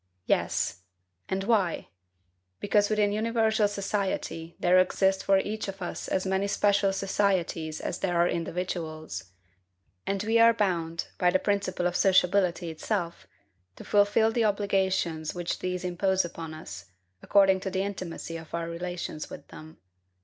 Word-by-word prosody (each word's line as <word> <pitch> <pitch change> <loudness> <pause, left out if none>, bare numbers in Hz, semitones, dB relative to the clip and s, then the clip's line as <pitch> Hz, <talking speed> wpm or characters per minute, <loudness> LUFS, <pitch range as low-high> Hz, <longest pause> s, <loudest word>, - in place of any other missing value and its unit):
Yes. - - 0 0.5
And 190 0 -1
why? 195 -6 +1 0.7
Because 205 0 +2
within 210 -1 +2
universal 220 0 +2
society 195 -5 -3
there 180 +1 +5
exist 190 +1 +2
for 195 0 +4
each 210 +3 -2
of 195 0 -6
us 175 - -5
as 185 - -1
many 190 +1 0
special 200 -1 +2
societies 190 -5 0
as - - -4
there 175 -3 0
are 170 +1 +4
individuals; 165 - -4 0.8
and 195 0 -1
we 225 +2 +2
are 230 0 +7
bound, 170 -5 -1
by 180 - +4
the 185 - +3
principle 195 -2 -1
of 175 0 0
sociability 180 -2 +3
itself, 170 +1 -3 0.5
to - - -10
fulfil 205 +2 +3
the 230 0 +1
obligations 190 -6 0
which 175 -1 -3
these 180 0 -3
impose 190 +1 +1
upon 165 -2 -7
us, 105 -10 -9 0.4
according 195 -1 +4
to 190 - -4
the 190 0 -1
intimacy 180 -4 -5
of 165 0 -8
our 170 0 -3
relations 170 -2 -5
with 145 - -10
them. 155 +1 -12
190 Hz, 145 wpm, -28 LUFS, 170-200 Hz, 0.8 s, are